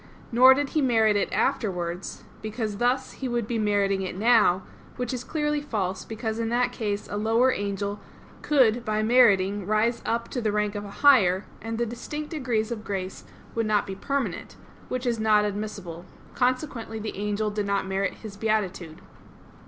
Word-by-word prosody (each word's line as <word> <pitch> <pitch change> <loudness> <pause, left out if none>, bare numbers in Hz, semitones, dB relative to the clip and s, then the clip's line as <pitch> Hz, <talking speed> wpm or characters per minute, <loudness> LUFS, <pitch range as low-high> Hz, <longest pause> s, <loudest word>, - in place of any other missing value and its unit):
Nor 255 +3 +8
did 285 0 -1
he 310 - 0
merit 225 -5 +3
it 205 - 0
afterwards, 180 -3 -2 0.2
because 215 -1 -3
thus 250 +3 +1
he 265 - -5
would 240 -2 -1
be 230 +1 -2
meriting 200 -2 +1
it 185 -1 -4
now; 210 -4 +4 0.3
which 250 0 -3
is 250 -1 -4
clearly 295 0 -1
false, 195 -9 -3
because 220 0 -4
in 225 -1 -1
that 245 +1 +1
case 205 -2 -3
a 205 - -4
lower 225 +4 +3
angel 200 0 -3 0.4
could 245 -5 +3
by 215 -1 0
meriting 205 -4 +4
rise 220 +3 +1
up 230 0 -1
to 250 - -3
the 215 -2 0
rank 210 0 0
of 205 -1 -4
a - - -8 0.2
higher, 200 -9 +6 0.2
and 225 0 -4
the 235 - 0
distinct 295 +6 -6
degrees 245 -8 -1
of 220 -2 -4
grace 190 -3 -5 0.3
would 230 -1 -1
not 210 -1 +2
be 195 - -5
permanent; 275 +8 -3 0.3
which 255 0 -3
is 235 -2 0
not 215 -1 +4
admissible. 200 -5 -5 0.3
Consequently 250 -3 -1
the 215 0 -5
angel 210 +1 -1
did 205 -1 -2
not 200 -1 0
merit 190 0 -1
his 215 -3 -10
beatitude. 195 -6 -2
215 Hz, 175 wpm, -26 LUFS, 200-240 Hz, 0.4 s, Nor